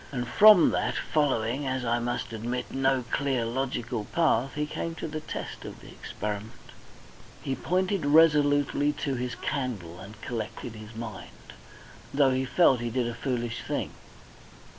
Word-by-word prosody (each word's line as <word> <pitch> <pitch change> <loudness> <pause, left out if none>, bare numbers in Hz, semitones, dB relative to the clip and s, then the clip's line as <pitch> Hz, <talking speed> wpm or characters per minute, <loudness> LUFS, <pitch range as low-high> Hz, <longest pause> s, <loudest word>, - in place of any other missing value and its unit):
And 125 -3 -3
from 205 - +7
that, - - 0
following, 135 -2 0
as 130 -1 -2
I 120 0 +1
must 120 -1 -3
admit, 120 +3 -4
no 135 -1 +2
clear 135 -4 0
logical 120 -2 -2
path, 135 -5 +1
he 150 0 0
came 165 +2 -4
to - - -5
the 155 0 -4
test 155 - -6
of - - -9
experiment. 105 +1 -7 0.7
He 135 - -2
pointed 185 +1 0
resolutely 145 -2 +4
to 140 -1 -3
his 125 -1 -3
candle 120 - -4
and 100 +3 -11
collected 115 0 -5
his 110 0 -11
mind, 110 -3 -9 0.6
though 140 -1 +4
he 130 +1 0
felt 135 -2 +4
he 120 0 -2
did 120 +1 0
a 120 - -3
foolish 120 -1 -3
thing. - - -3
130 Hz, 150 wpm, -27 LUFS, 115-145 Hz, 0.7 s, from